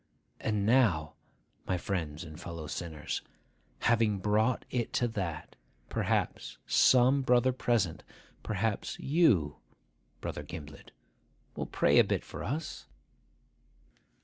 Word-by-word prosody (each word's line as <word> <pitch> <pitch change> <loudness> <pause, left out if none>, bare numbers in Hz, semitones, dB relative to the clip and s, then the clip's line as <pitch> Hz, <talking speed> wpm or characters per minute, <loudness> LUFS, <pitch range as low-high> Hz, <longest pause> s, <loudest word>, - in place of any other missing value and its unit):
And 105 -2 0
now, 105 -11 +3 0.5
my 90 - +1
friends 80 -5 -3
and 80 -1 -10
fellow 85 -2 -6
sinners, 80 0 -4 0.6
having 115 -3 +3
brought 105 +5 +1
it 120 -2 -2
to 120 - +2
that, 95 -8 -4 0.3
perhaps - - -1
some 130 +2 +5
brother 125 0 +3
present—perhaps 110 -1 -2
you, 115 - +3 0.6
Brother - - -4
Gimblet—will 75 -4 -11
pray - - +4
a - - +8
bit - - -1
for - - -7
us? 150 +6 -4
105 Hz, 100 wpm, -31 LUFS, 80-120 Hz, 0.6 s, a